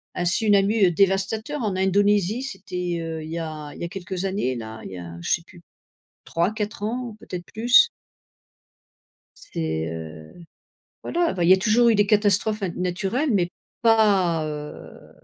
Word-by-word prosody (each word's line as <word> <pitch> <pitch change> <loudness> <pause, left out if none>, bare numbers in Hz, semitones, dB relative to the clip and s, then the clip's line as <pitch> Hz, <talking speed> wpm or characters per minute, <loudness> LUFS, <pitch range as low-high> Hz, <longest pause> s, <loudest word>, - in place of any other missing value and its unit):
un 175 - -1
tsunami 200 +1 +3
dévastateur 200 - +1
en 210 -5 -1
Indonésie, 200 +3 +2
c'était, 180 -8 -4
heu, 165 -1 -4
il 155 - -8
y 170 - -3
a 155 -2 -6
il - - -11
y - - -3
a 170 - -3
quelques 185 0 -5
années 190 -10 -1
là, 110 -1 -7
il - - -8
y 95 - -7
a 85 -1 -8
je - - -4
sais - - +2
plus 175 -1 -16 0.6
3-4 205 +4 -2
ans, 235 0 -3
peut-être 180 -3 -7
plus. 240 - +5 1.5
C'est, 80 - -3
heu, 80 -1 -8 0.7
voilà, 340 0 0
bah, 175 - -1
il 170 - +4
y - - +11
a 190 - +7
toujours 230 +5 +3
eu 230 - +5
des 205 -1 +3
catastrophes 210 +1 +2
na 190 - 0
naturelles, 195 - -1
mais 175 -4 +1 0.3
pas, 200 -8 +3
heu 150 -1 -8
190 Hz, 165 wpm, -24 LUFS, 170-215 Hz, 1.5 s, y